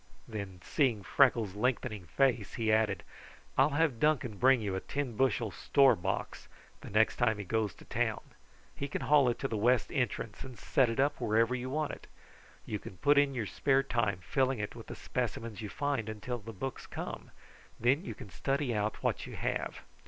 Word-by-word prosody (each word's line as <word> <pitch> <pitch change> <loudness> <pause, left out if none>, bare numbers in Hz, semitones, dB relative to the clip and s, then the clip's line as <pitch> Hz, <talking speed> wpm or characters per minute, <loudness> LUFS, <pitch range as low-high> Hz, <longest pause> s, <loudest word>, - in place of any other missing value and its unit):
Then, 100 -5 -6
seeing 120 -9 +1
Freckles' 115 -5 +3
lengthening 110 -2 -1
face, 120 - +1
he 110 -2 +1
added: 110 -1 +2 0.5
"I'll - - +5
have 150 -8 +2
Duncan 130 -8 +1
bring 130 0 +5
you 105 -3 -2
a - - -1
ten 140 +1 -3
bushel 120 -3 +1
store 135 +5 +4
box 85 - -3 0.3
the - - -9
next 110 +2 +3
time 110 -3 +2
he 105 - -4
goes 110 0 -1
to - - -15
town. - - -1 0.5
He 140 - -3
can 145 - -4
haul 145 -4 +5
it 120 - -1
to 135 - -2
the 115 - -2
west 120 +3 +2
entrance 125 -5 -2
and 130 -3 -9
set 130 -3 +2
it 115 - -3
up 140 0 +1
wherever 115 +1 +2
you 130 0 -3
want 150 +2 -1
it. - - -10 0.6
You 105 - -3
can 95 - -10
put 145 +9 +5
in 140 -1 +2
your 115 -4 -1
spare 135 +7 +2
time 115 -7 0
filling 130 +6 +1
it 105 -1 -4
with - - -10
the - - -7
specimens 115 -3 -3
you 105 - -5
find 140 -5 -1
until 115 +3 -4
the 115 +1 -8
books 130 +6 -6
come, - - -6 0.5
and - - -30
then 130 +8 +3
you - - -6
can 100 - -11
study 135 - -1
out 105 0 -2
what - - -1
you - - -8
have. - - -2
120 Hz, 200 wpm, -32 LUFS, 105-135 Hz, 0.6 s, I'll